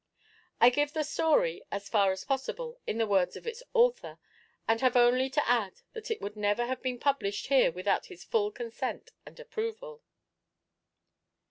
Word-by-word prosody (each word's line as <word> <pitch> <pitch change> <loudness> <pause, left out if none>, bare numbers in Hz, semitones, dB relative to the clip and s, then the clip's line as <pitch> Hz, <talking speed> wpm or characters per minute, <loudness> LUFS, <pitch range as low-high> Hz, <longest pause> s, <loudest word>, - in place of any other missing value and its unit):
I 240 - +7
give 290 +3 0
the 310 -2 0
story, 300 - +1
as 200 0 -4
far 200 -3 +3
as 190 0 -5
possible, 475 - -3
in 220 - -2
the 225 - +2
words 190 -4 +1
of - - -12
its 465 +1 -5
author; 485 0 +2 0.5
and 225 0 +2
have 255 -1 +3
only 250 +2 +4
to 285 +2 0
add 230 -6 0
that 450 -1 -7
it 450 - -2
would 205 +1 -5
never 210 +3 +1
have 255 +1 -3
been 255 -1 -2
published 240 -7 -1
here 270 -9 +5
without 185 +4 -1
his 370 - -12
full 425 -3 +1
consent 460 +3 -5 0.2
and - - -13
approval. 465 0 -5
260 Hz, 170 wpm, -30 LUFS, -, 0.5 s, I